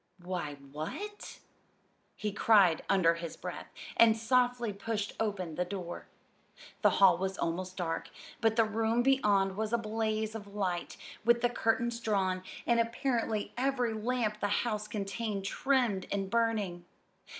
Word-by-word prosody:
"Why, 175 -5 -3
what 155 - -7 0.4
" - - -40 0.3
he 210 -1 -3
cried 200 -6 +5
under 185 -4 +4
his 170 -1 -6
breath, - - -6 0.3
and 230 -1 +6
softly 245 -1 +2
pushed 205 0 -3
open 200 -6 -2
the 180 - 0
door. 180 -2 -6 0.7
The - - +6
hall 185 -3 +6
was 190 0 -2
almost 180 +2 -3
dark, 165 -3 -2 0.3
but 225 -1 +2
the 225 -1 +4
room 225 +2 +1
beyond 205 -8 +3
was 215 +1 -2
a 235 - +3
blaze 220 -1 -1
of 215 -2 -7
light, 180 -4 -2 0.3
with 235 +1 +4
the 245 - +2
curtains 235 0 0
drawn, 190 -5 0 0.2
and 235 -1 +3
apparently 230 -2 -1
every 250 -2 0
lamp 220 -1 -1
the 205 - 0 0.2
house 215 -2 -2
contained 205 0 -3
trimmed 235 -3 +1
and 195 -1 -2
burning. 215 -7 0
215 Hz, 145 wpm, -31 LUFS, 190-230 Hz, 0.7 s, and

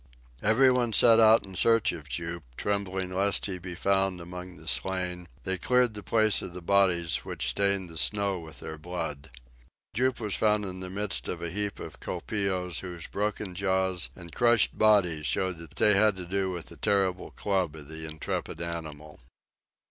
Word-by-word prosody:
Everyone 125 +1 +4
set 115 +2 +6
out 110 0 +6
in 95 - -11
search 115 +3 +3
of 80 -4 -9
Jup, 85 +6 -4 0.2
trembling 95 -2 -2
lest 100 +2 +2
he 100 - -2
should 90 -1 -5
be 90 0 -7
found 95 0 +1
among 90 +1 -8
the - - -15
slain; 90 -2 -2 0.2
they 95 -1 -1
cleared 125 +3 +2
the 105 - -7
place 110 -1 +2
of 90 - -7
the 90 - -7
bodies 90 -3 +3
which - - -3
stained 100 +3 +2
the 80 -2 -5
snow 100 0 +1
with 80 -1 -10
their 80 0 -7
blood. 80 -3 -5 0.6
Jup 125 +3 +1
was 105 -4 0
found 105 -1 +2
in 95 -1 -5
the 95 0 -4
midst 100 +1 -1
of 85 -1 -4
a 85 - -3
heap 105 +2 -2
of - - -9
colpeos 90 -2 -2
whose 90 -3 -7
broken 105 -1 -3
jaws 95 -1 +1
and 85 -2 -11
crushed 120 -3 +3
bodies 90 -8 +3
showed 95 -3 -1
that 85 -2 -11
they 105 - +4
had 105 +1 +4
to 90 -1 -7
do 95 +1 -1
with 90 -2 -6
the - - -13
terrible 95 -2 0
club 95 -6 -1
of 75 -2 -11
the 80 +1 -7
intrepid 80 +1 -4
animal. 80 -3 -6
95 Hz, 185 wpm, -28 LUFS, 85-105 Hz, 0.6 s, set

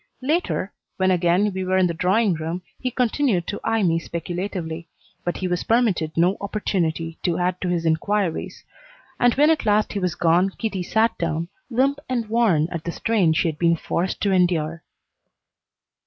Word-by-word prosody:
Later, 300 - 0 0.2
when 190 0 +2
again 180 +3 +2
we 190 0 -3
were 185 0 +1
in 185 - +4
the 170 - 0
drawing 190 +5 +2
room, 165 +3 -4 0.2
he 255 - -1
continued 245 - +1
to 205 - -4
eye 225 -1 +1
me 165 -2 +2
speculatively, 170 -1 -5 0.4
but 175 - -2
he 185 - -2
was 180 -1 -1
permitted 205 -10 +1
no 180 +4 +3
opportunity 170 -5 -2
to 175 -2 0
add 180 0 -1
to 185 - -1
his 170 -2 -1
inquiries; 170 +2 -1 0.6
and 245 -1 +4
when 295 +3 +5
at 315 - +1
last 210 0 +2
he 205 - -1
was 180 -3 -1
gone 175 +3 +3
Kitty 210 -5 -2
sat 220 +5 +1
down, 165 0 -2 0.2
limp 270 +3 +1
and 240 -3 -1
worn 210 -10 +3
at 170 -3 -4
the 170 - -3
strain 205 -4 +1
she 160 - +1
had 155 -2 -3
been 170 -1 +3
forced 175 +2 -2
to 200 - +2
endure. 170 -3 +1
185 Hz, 180 wpm, -23 LUFS, 170-215 Hz, 0.6 s, when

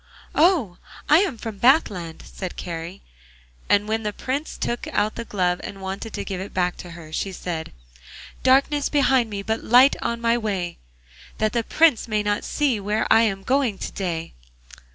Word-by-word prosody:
'Oh! 305 - +3 0.3
I 305 - +7
am 370 - 0
from 220 -2 -7
Bathland,' 205 - +2
said 185 -2 -7
Kari. 170 +2 -6 0.7
And 205 +1 +3
when 220 +1 0
the 210 -1 -2
Prince 275 +8 -4
took 240 - -3
out 215 +1 0
the - - -5
glove 180 -4 0
and 195 - -7
wanted 195 +4 -5
to - - -4
give 190 -2 -4
it 195 - -8
back 180 -1 +1
to 175 - -9
her, 160 -2 -11
she 195 - -2
said: 170 -3 -5 0.7
'Darkness 275 +2 +3
behind 265 -5 +3
me, 200 -1 -5
but 220 +2 -2
light 250 +4 +6
on 235 0 -2
my 235 0 +2
way, 190 -6 -3 0.6
That 215 0 0
the 235 - +1
Prince 310 -3 +3
may 215 -2 0
not 205 +1 0
see 275 -7 0
where 210 +2 -1
I'm 215 -4 +3
going 255 -5 +1
to - - -5
day! 170 -4 -4
215 Hz, 175 wpm, -23 LUFS, 190-245 Hz, 0.7 s, I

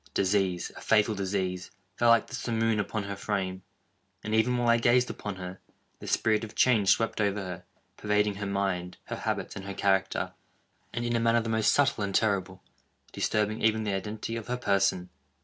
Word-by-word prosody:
Disease—a 95 -2 0
fatal 110 0 +3
disease, 95 -2 -2 0.3
fell 120 +3 +3
like 115 -1 +5
the - - -14
simoon 115 -2 0
upon 105 +1 -2
her 100 0 -5
frame; 95 -2 -3 0.6
and, 110 - -3
even 125 +3 +3
while 120 0 0
I 115 0 +5
gazed 120 +1 +3
upon 105 -2 -6
her, 90 0 -7 0.4
the - - -9
spirit 110 0 +2
of 110 - -8
change 110 -6 +4
swept 115 -1 +2
over 100 0 +1
her, 90 -2 -6 0.3
pervading 105 0 +1
her 100 -1 -3
mind, 95 -3 -2
her - - -5
habits, - - -3
and - - -6
her 100 0 -6
character, 95 -1 0 0.6
and, 120 0 -3
in 120 0 0
a - - +2
manner 115 0 +3
the 115 - -4
most 110 -1 +3
subtle 140 -7 +2
and 100 -1 -2
terrible, 95 -3 0 0.5
disturbing 105 +1 0
even 110 0 +2
the 105 -2 -1
identity 105 +3 -4
of 115 -2 -6
her 125 0 -1
person! 95 -5 +1
105 Hz, 185 wpm, -28 LUFS, 95-115 Hz, 0.6 s, like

